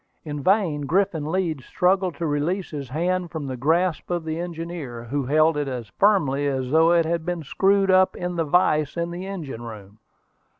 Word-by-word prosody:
In 145 -1 -4
vain 165 -5 +1
Griffin 165 -3 0
Leeds 165 -7 -1
struggled 185 -1 +1
to 170 - -3
release 160 +6 -1
his 140 -4 -6
hand 175 +5 -1
from 160 -3 -5
the 130 -1 -4
grasp 165 +7 0
of 175 -2 -2
the 160 +1 -3
engineer, 165 -8 -6
who 135 +2 -3
held 155 +2 +3
it 145 -1 -1
as 125 -5 -5
firmly 145 -9 +3
as 130 -2 -2
though 160 +2 +5
it 170 -1 +4
had 165 0 -1
been 175 -1 -3
screwed 195 +5 +2
up 185 0 +4
in 180 0 -4
the 165 - +1
vise 155 -1 +2
in 170 0 -2
the 180 +2 -6
engine 160 -12 -6
room. 105 -3 -10
160 Hz, 195 wpm, -24 LUFS, 145-180 Hz, -, though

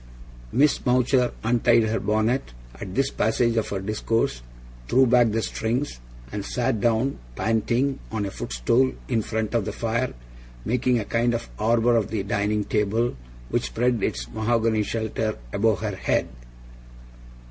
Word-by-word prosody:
Miss 145 +2 +3
Mowcher 125 0 +3
untied 120 0 +4
her 110 +1 0
bonnet, 110 - 0 0.2
at 90 +10 -8
this 135 +1 +1
passage 115 +1 +1
of 110 - 0
her 100 - -2
discourse, 105 - -1 0.5
threw 130 +2 +5
back 120 -1 +5
the 110 +1 -1
strings, 120 - -2 0.3
and 100 - -4
sat 120 0 -1
down, 120 +3 +1 0.2
panting, 120 +5 0
on 110 -2 -1
a 100 - -4
footstool 105 - +1
in 115 -3 +1
front 110 +1 -3
of 115 -3 +2
the 105 - -2
fire 115 +4 -1 0.5
making 125 +1 +2
a 110 - -2
kind 120 +2 +1
of 115 - -5
arbour 115 +2 +3
of 110 -3 +2
the 105 -3 -2
dining 105 +1 0
table, 110 +4 0 0.3
which - - 0
spread 120 -1 0
its - - -2
mahogany 110 - +1
shelter 110 0 -2 0.2
above 110 +1 +2
her 105 -3 -2
head. - - 0
115 Hz, 150 wpm, -24 LUFS, 105-120 Hz, 0.5 s, threw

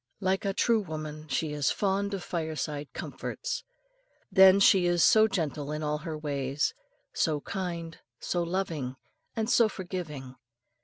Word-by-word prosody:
Like 190 0 0
a 195 - +1
true 230 -2 +3
woman, 155 -3 -6
she 150 +1 -1
is 145 -2 +1
fond 200 0 0
of 185 - -6
fireside 155 -3 -3
comforts. - - -5 0.7
Then 190 0 +8
she 190 -2 +6
is 175 -1 +3
so 220 0 +6
gentle 150 - -2
in 150 0 -3
all 150 0 -1
her 155 0 -5
ways, 140 -2 -1 0.4
so 155 -2 +1
kind, 170 -3 -5 0.2
so 175 - -1
loving, 170 -7 -2 0.4
and 220 -2 -1
so 230 -1 +4
forgiving. 155 -10 -6
165 Hz, 145 wpm, -29 LUFS, 150-190 Hz, 0.7 s, Then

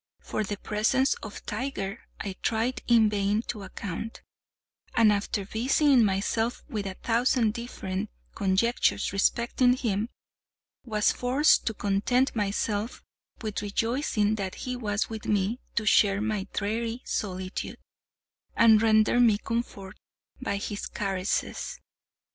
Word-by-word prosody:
For 215 - -3
the 205 0 -4
presence 225 +7 +1
of 210 - -8
Tiger 235 -6 -3 0.2
I 200 - -4
tried 230 +3 0
in 230 -2 +6
vain 205 +1 +1
to 215 -4 -5
account; 195 +3 -6 0.7
and 225 -2 +6
after 200 0 -2
busying 255 +4 +3
myself 215 +4 0
with 205 -3 -3
a 190 - -5
thousand 235 -1 +2
different 210 -4 -4 0.2
conjectures 200 +5 +1
respecting 235 +5 +3
him, 225 -3 -1 0.7
was 215 -3 +2
forced 260 +5 +3
to 225 - 0
content 210 +8 +1
myself 210 +1 -1 0.4
with 215 -2 -3
rejoicing 215 0 0
that 190 -2 -3
he 250 0 -4
was 210 -4 -1
with 220 -1 -7
me 210 +3 +1 0.2
to 215 - 0
share 200 -1 +4
my 210 -2 -2
dreary 225 +4 -2
solitude, 185 -2 -3 0.8
and 220 -2 +6
render 220 +1 +4
me 230 -4 +5
comfort 210 -3 -4 0.4
by 200 - -1
his 205 0 -4
caresses. 195 -1 -2
215 Hz, 125 wpm, -27 LUFS, 200-235 Hz, 0.8 s, in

